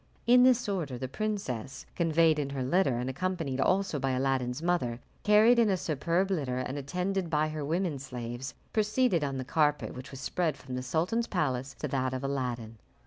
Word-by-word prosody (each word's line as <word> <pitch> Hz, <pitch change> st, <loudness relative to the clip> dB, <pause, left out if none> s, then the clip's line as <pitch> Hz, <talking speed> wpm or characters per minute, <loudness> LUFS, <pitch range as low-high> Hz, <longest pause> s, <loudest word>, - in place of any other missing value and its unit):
In 245 Hz, +1 st, +7 dB
this 250 Hz, -2 st, +4 dB
order 165 Hz, -11 st, -2 dB
the 130 Hz, -, -4 dB
princess, 135 Hz, -, -4 dB
conveyed 165 Hz, -2 st, +3 dB
in 140 Hz, -2 st, -2 dB
her 135 Hz, -2 st, -3 dB
litter, 135 Hz, -2 st, +2 dB
and 125 Hz, +1 st, -2 dB
accompanied 150 Hz, -2 st, -2 dB
also 190 Hz, -4 st, +1 dB
by 135 Hz, -, 0 dB
Aladdin's 130 Hz, -1 st, 0 dB
mother, 150 Hz, -10 st, 0 dB, 0.2 s
carried 220 Hz, +3 st, +6 dB
in 225 Hz, -2 st, +4 dB
a 190 Hz, -, +2 dB
superb 170 Hz, +4 st, 0 dB
litter 135 Hz, -9 st, -1 dB
and 130 Hz, +1 st, -3 dB
attended 180 Hz, +6 st, -2 dB
by 155 Hz, -1 st, +1 dB
her 155 Hz, -1 st, -4 dB
women 165 Hz, 0 st, -1 dB
slaves, 125 Hz, -1 st, -6 dB, 0.2 s
proceeded 215 Hz, -5 st, +2 dB
on 135 Hz, -2 st, -2 dB
the 130 Hz, -, -4 dB
carpet 150 Hz, +1 st, +1 dB
which 130 Hz, 0 st, -8 dB
was 135 Hz, -, -9 dB
spread 155 Hz, +1 st, -1 dB
from 130 Hz, -1 st, -9 dB
the 125 Hz, -, -2 dB
sultan's 170 Hz, -, 0 dB
palace 135 Hz, -6 st, -1 dB
to 150 Hz, -, -4 dB
that 130 Hz, -1 st, -1 dB
of 130 Hz, -, -4 dB
Aladdin. 120 Hz, -5 st, -3 dB
145 Hz, 190 wpm, -30 LUFS, 130-185 Hz, 0.2 s, In